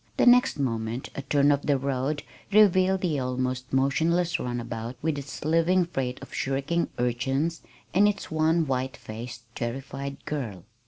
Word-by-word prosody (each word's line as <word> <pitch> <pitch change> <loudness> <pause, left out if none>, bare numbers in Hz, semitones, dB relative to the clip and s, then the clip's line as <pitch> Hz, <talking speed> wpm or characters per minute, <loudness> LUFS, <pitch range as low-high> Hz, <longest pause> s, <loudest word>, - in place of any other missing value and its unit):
The - - +4
next 250 -2 +6
moment 115 -2 -2
a - - -4
turn 140 +1 +3
of 140 0 0
the 145 -2 +4
road 140 +2 -1 0.3
revealed 190 -2 +5
the 160 -6 0
almost 130 0 -2
motionless 165 +6 +2
runabout 120 -1 -4
with 155 -2 0
its 140 +1 -8
living 165 +3 +3
freight 130 -7 -3
of - - -12
shrieking 135 +6 -1
urchins, 135 +7 0 0.3
and 200 +4 +5
its 200 -4 -2
one 160 +1 +2
white 130 -1 -2
faced, 115 +2 -8
terrified 135 +4 -4
girl. 115 - -4
140 Hz, 150 wpm, -27 LUFS, 125-165 Hz, 0.3 s, next